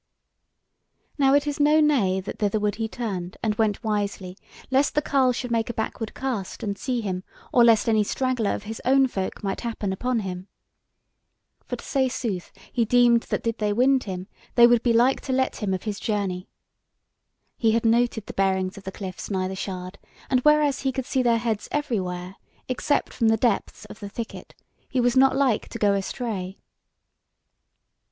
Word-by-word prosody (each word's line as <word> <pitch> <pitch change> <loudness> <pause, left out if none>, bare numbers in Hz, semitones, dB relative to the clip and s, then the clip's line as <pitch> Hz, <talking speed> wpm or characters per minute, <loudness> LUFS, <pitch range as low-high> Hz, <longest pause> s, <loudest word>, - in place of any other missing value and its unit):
Now 270 0 +5
it 285 - +3
is 290 0 -3
no 300 +2 +5
nay 245 -12 +3
that 190 - -7
thitherward 210 0 0
he 225 -1 -1
turned, 195 -6 -5
and 220 -2 +1
went 215 0 0
wisely, 200 -4 -2 0.4
lest 270 +2 +2
the 300 - +3
carle 265 -3 +3
should 245 0 -4
make 230 -1 0
a 235 - -4
backward 220 0 -4
cast, 245 -8 -4
and 200 -2 -2
see 245 +3 -2
him, 185 -3 -3 0.3
or 240 - +6
lest 230 -2 +5
any 220 -2 +3
straggler 250 -1 0
of - - -7
his 220 +1 -7
own 270 +1 +5
folk 195 -7 -4
might 195 -1 -2
happen 220 -5 -3
upon 245 +3 -1
him. 185 -1 -6 1.2
For - - -3
to - - -12
say 265 -2 +1
sooth, 215 -8 -4 0.2
he 240 - +2
deemed 240 0 +4
that - - -1
did 230 0 -2
they 210 -1 +1
wind 260 +3 +3
him, 185 -2 -5 0.3
they 235 - +8
would 240 -1 +5
be 240 - +2
like 240 +3 +3
to 265 - -3
let 260 0 0
him 205 -3 -2
of 185 -1 -2
his 210 -2 -4
journey. 195 -4 -2 1.1
He 225 -2 +2
had 230 0 +1
noted 230 -1 +2
the - - -8
bearings 190 0 0
of 195 - -18
the 190 - -4
cliffs 190 -2 -7
nigh 190 -2 -1
the 190 - -5
shard, 185 0 -6 0.3
and 255 - +4
whereas 300 0 +3
he 270 - 0
could 265 -1 -4
see 260 - 0
their 235 -2 +3
heads 225 -2 -2
everywhere 190 -10 -2 0.3
except 260 +3 0
from 230 - +1
the 225 0 +4
depths 225 -2 -1
of - - -12
the 205 - -7
thicket, 225 +2 -7 0.3
he 260 - 0
was 245 0 +2
not 265 0 +5
like 260 -6 +1
to - - -6
go 205 -1 +3
astray. 195 -1 -3
225 Hz, 190 wpm, -25 LUFS, 200-255 Hz, 1.2 s, they